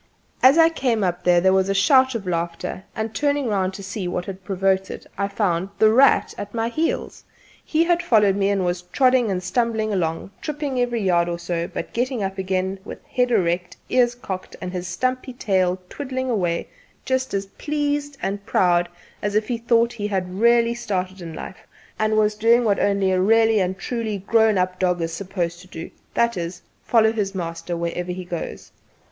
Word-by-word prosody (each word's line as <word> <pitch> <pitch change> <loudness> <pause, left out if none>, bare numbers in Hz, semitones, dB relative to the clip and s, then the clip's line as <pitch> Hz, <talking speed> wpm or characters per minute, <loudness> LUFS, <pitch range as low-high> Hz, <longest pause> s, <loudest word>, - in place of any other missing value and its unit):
As 265 +4 +7
I 325 0 +7
came 250 -9 0
up 180 -1 -2
there 180 +1 +4
was 190 0 +2
a 195 - +1
shout 260 +5 +4
of 215 -4 -4
laughter, 170 +1 -3
and 220 0 -3
turning 285 0 0
round 190 -4 0
to 195 - -8
see 195 -1 -4
what 180 0 -3
had 190 -1 -8
provoked 190 0 0
it - - -8
I 200 0 -1
found 195 -3 -1
"The 215 0 +5
Rat" 265 +4 +4
at 205 +2 -6
my 225 0 0
heels. 315 +7 -2 0.4
He 320 +1 +2
had 345 0 +2
followed 210 - +4
me 200 0 +1
and 195 -2 +1
was 175 0 -1
trotting 250 +5 +2
and 185 -2 -2
stumbling 220 -2 0
along, 165 0 -2
tripping 290 -4 -3
every 240 -3 0
yard 175 -2 +2
or 170 - -2
so, 170 0 -3
but - - -6
getting 245 -2 -1
up 195 0 -3
again 190 0 -1
with - - -10
head 250 -1 0
erect, 180 -5 0
ears 245 -1 +3
cocked 190 -6 -6
and 180 0 -6
his 180 -1 -4
stumpy 255 +7 -2
tail 185 -6 +1
twiddling 260 +1 -4
away 175 -6 -1 0.4
just 260 -3 -1
as 195 0 -1
pleased 290 +5 -2
and 200 +1 -2
proud 175 -3 +2 0.3
as 205 0 -2
if 215 +2 +1
he 240 -2 -1
thought 235 0 +2
he 210 -3 -3
had 185 -3 -2
really 235 0 +4
started 190 -5 -3
in 165 -2 -7
life - - -9 0.3
and 215 0 +2
was 210 0 +3
doing 230 +3 +4
what 205 -3 +2
only 200 -1 +2
a 185 0 +2
'really 225 +2 +4
and 185 0 -1
truly' 220 0 -3
grown¬ 220 +1 +3
up 185 0 0
dog 180 -1 +1
is 165 0 -2
supposed 175 -1 -3
to 185 - -15
do 165 -2 -8 0.2
that 235 -3 +2
is, 170 +1 -5 0.2
follow 220 -2 +4
his 200 -3 -2
master 170 -1 -4
wherever 170 +1 -3
he 180 0 -6
goes. 175 -2 -6
200 Hz, 195 wpm, -22 LUFS, 180-235 Hz, 0.4 s, As